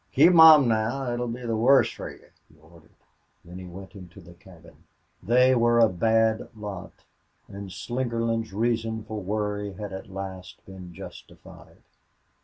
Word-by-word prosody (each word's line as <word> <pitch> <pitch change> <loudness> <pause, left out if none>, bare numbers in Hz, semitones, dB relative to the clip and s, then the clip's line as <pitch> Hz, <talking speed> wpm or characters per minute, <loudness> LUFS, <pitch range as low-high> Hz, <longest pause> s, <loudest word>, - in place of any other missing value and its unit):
"Keep 165 +7 +5
mum 160 -5 +8
now 115 +4 -1
or 120 - -2
it 120 - -4
'll 120 - -2
be 120 +1 -6
the 115 -1 -1
wuss 130 +5 +4
fer - - -8
you," - - -16 0.2
he 80 - -24
ordered; 80 +1 -20 0.6
then 90 +2 -10
he 95 - -9
went 95 +2 -11
into 90 -2 -13
the 85 -1 -15
cabin. 85 -1 -19 0.4
They 125 +5 +3
were 120 -1 +2
a 115 -1 +5
bad 110 +3 +1
lot, 105 -4 -9 0.4
and 100 0 -9
Slingerland's 115 +2 -3
reason 110 +1 -2
for 110 -1 -6
worry 105 0 -3
had 100 0 -8
at 95 +1 -9
last 95 -1 -9
been 95 -2 -11
justified. 85 - -14
110 Hz, 165 wpm, -25 LUFS, 95-120 Hz, 0.6 s, mum